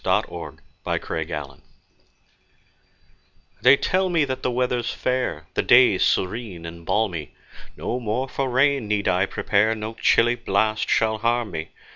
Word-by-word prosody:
P.G. - - +2
Wodehouse - - -8 0.3
The - - -1
Pessimist 75 -4 -5 2.0
THEY 140 - +7
tell 185 +4 0
me 165 -4 +2
that 130 -1 -4
the - - 0
weather's 125 -1 -1
fair, 125 -12 -2
The - - +1
day 120 -6 +5
serene 95 -3 -1
and 85 0 -9
balmy; 90 -9 -1 0.4
No 125 - -3
more 120 +3 -2
for 135 0 -2
rain 135 -1 +2
need 105 -1 -1
I 95 +1 +2
prepare 110 +3 +1
No 110 +1 -5
chilly 115 +1 +3
blast 110 -1 0
shall 110 -1 +1
harm 115 -1 0
me. 80 -1 -5
110 Hz, 145 wpm, -23 LUFS, 95-125 Hz, 2.0 s, THEY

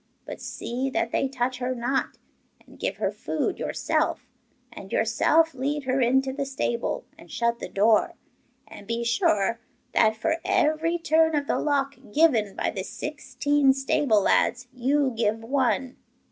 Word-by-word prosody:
But - - -8
see 255 +3 -3
that 230 -3 -1
they 270 - +1
touch 255 -1 -2
her 255 0 -2
not, 250 +3 -1 0.5
and - - -18
give - - -2
her - - -1
food - - -3
yourself, - - -1 0.5
and 195 - -10
yourself 310 +8 +3
lead 280 +3 -2
her 260 +1 0
into 265 +2 +2
the 280 +1 -2
stable, 265 -3 -2
and - - -15
shut 235 0 -1
the - - -6
door. 215 +2 +3 0.5
And 205 - -12
be 230 +1 -2
sure 230 -2 +1 0.3
that 220 -1 +4
for 320 +8 0
every 320 +3 +1
turn 320 -1 +3
of 290 -1 0
the - - 0
lock 280 -1 0
given 235 -9 +3
by - - -1
the 190 - -4
sixteen 290 +1 0
stable 265 -4 +2
lads 245 +5 +2
you 265 +2 +1
give 225 0 0
one. 260 +1 0
260 Hz, 155 wpm, -25 LUFS, 235-285 Hz, 0.5 s, that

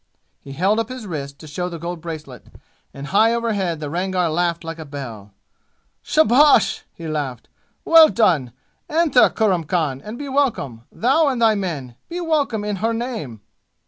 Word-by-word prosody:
He 135 - -10
held 195 +8 +1
up 225 - -2
his 255 -3 -7
wrist 140 -6 -6
to 155 - -12
show 180 +4 -4
the 170 - -6
gold 170 +1 -6
bracelet, 155 -7 -8 0.4
and 140 0 -8
high 220 +8 +3
over 235 0 -1
his 205 -3 -1
head 170 -4 -2
the 150 - -5
Rangar 180 +2 -1
laughed 170 +1 -1
like 165 0 -6
a - - -5
bell. 125 -9 -8 0.7
"Shabash!" 295 -4 +4
he 165 - -9
laughed. 145 -5 -4 0.4
"Well 325 -1 +8
done! 165 - +2 0.4
Enter, 315 -5 +4
Kurram 190 -7 0
Khan, 150 -6 -1
and 215 +3 -7
be 290 - -6
welcome, 255 - -1
thou 275 +7 +2
and 260 -3 0
thy 225 -2 +4
men. 150 - -4
Be 350 +1 -4
welcome 295 -10 0
in 210 -1 -2
her 225 +4 0
name!" 225 - -5
180 Hz, 175 wpm, -21 LUFS, 150-235 Hz, 0.7 s, Well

